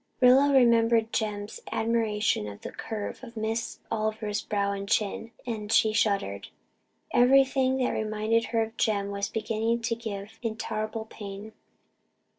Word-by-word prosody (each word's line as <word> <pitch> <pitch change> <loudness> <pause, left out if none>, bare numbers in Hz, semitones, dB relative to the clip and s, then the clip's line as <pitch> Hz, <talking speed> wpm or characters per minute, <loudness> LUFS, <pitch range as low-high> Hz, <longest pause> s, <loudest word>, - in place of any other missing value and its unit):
Rilla 260 +3 +6
remembered 230 -3 +4
Jem's 210 - -2
admiration 220 - +1
of 100 -1 -9
the - - -6
curve 220 +3 -5
of 235 -2 -10
Miss 220 +1 -2
Oliver's 215 -1 -1
brow 200 -1 -1
and 200 0 -5
chin, 220 +1 0 0.2
and 215 -3 -4
she 220 -1 +4
shuddered. 195 - 0 0.6
Everything 265 +1 +4
that 255 -1 +1
reminded 220 +1 0
her 225 -1 +1
of 225 +1 -8
Jem 200 -2 +1
was 200 0 -2
beginning 225 +1 -1
to 230 - 0
give 210 -2 -7
intolerable 220 -1 -3
pain. 205 0 -9
220 Hz, 135 wpm, -27 LUFS, 210-230 Hz, 0.6 s, Rilla